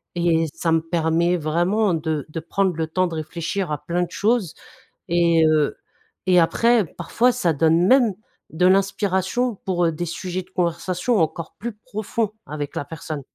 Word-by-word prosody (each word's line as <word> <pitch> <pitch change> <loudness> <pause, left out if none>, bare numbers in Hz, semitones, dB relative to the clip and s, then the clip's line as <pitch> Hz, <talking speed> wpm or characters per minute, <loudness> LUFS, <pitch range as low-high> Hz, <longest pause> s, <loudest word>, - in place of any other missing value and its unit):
Et 165 -2 +2
ça 165 - -1
me 160 0 +3
permet 170 +1 +1
vraiment 175 +6 +1
de 155 -2 -2
de 165 - -5
prendre 190 +2 0
le 160 0 -2
temps 185 +3 +1
de 165 - -6
réfléchir 170 +3 -3
à 145 - -2
plein 175 +2 0
de 175 - -5
choses, 210 -5 0 0.5
et 170 -1 +4
heu, 155 -2 +2 0.5
et 180 -1 +6
après, 230 +5 +3
parfois, 225 +10 0
ça 175 -9 +1
donne 165 +3 +3
même 250 -4 +5 0.4
de 175 +3 +1
l'inspiration 195 +4 +1
pour, 175 -2 +1
heu, 165 - +2
des 175 +3 -3
sujets 180 +2 -4
de - - -27
conversation 180 +5 0
encore 160 +1 -2
plus 235 +1 -4
profonds 215 -1 -3 0.2
avec 145 -1 -5
la 140 - -3
personne. 155 -2 -6
175 Hz, 170 wpm, -22 LUFS, 160-195 Hz, 0.5 s, et